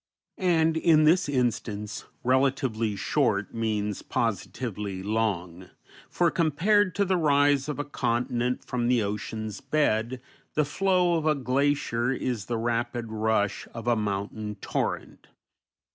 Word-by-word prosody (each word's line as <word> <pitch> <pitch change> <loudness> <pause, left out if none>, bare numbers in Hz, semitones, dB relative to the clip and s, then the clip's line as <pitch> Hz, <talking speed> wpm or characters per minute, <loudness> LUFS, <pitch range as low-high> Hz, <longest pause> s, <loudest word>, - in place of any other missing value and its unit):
And 165 -3 +3
in 160 -1 +5
this 165 +1 +4
instance 110 -5 -2 0.2
"relatively 125 -4 +1
short" 100 -1 0
means 105 -3 -1
positively 105 -2 -3
long; 95 -5 -2 0.4
for, 170 -2 +2
compared 185 +4 +2
to 200 - +2
the 185 -1 +1
rise 145 -2 +3
of 150 - -3
a 145 - -1
continent 125 -2 -1
from 120 -1 -1
the 120 -2 +3
ocean's 105 +1 -4
bed, 125 -5 0 0.4
the 150 - +3
flow 180 +2 +2
of 155 - -2
a 155 - +4
glacier 130 -2 0
is 125 -5 -2
the 120 - -2
rapid 115 0 -2
rush 110 -2 0
of 115 - -6
a 120 -1 +3
mountain 105 0 -3
torrent. 100 - -3
120 Hz, 130 wpm, -27 LUFS, 110-150 Hz, 0.4 s, in